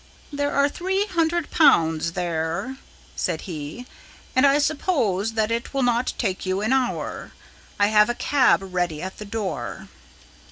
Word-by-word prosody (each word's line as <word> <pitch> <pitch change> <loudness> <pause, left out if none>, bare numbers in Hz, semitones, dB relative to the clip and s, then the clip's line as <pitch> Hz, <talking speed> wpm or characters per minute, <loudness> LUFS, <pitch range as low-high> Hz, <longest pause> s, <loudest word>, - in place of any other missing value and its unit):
"There 285 0 -1
are 280 0 +3
one 380 +6 -1
hundred 340 -2 0
pounds 165 - +4
there," 170 +8 -2 0.4
said - - -2
he, 160 +6 -7 0.5
"and 260 +2 +6
I 280 +1 +4
promise 280 - 0
you 225 - -10
that 220 0 +1
it 235 +4 -3
will 270 - +1
not 245 0 +1
take 190 -6 -2
you 185 +1 -1
an 220 +5 +1
hour. 260 -2 -2 0.5
I 205 0 +4
have 210 +1 +5
a 240 - 0
cab 275 -7 +3
ready 175 -4 -1
at 190 0 -7
the 210 - -6
door." 205 -2 -5
230 Hz, 160 wpm, -23 LUFS, 185-285 Hz, 0.5 s, and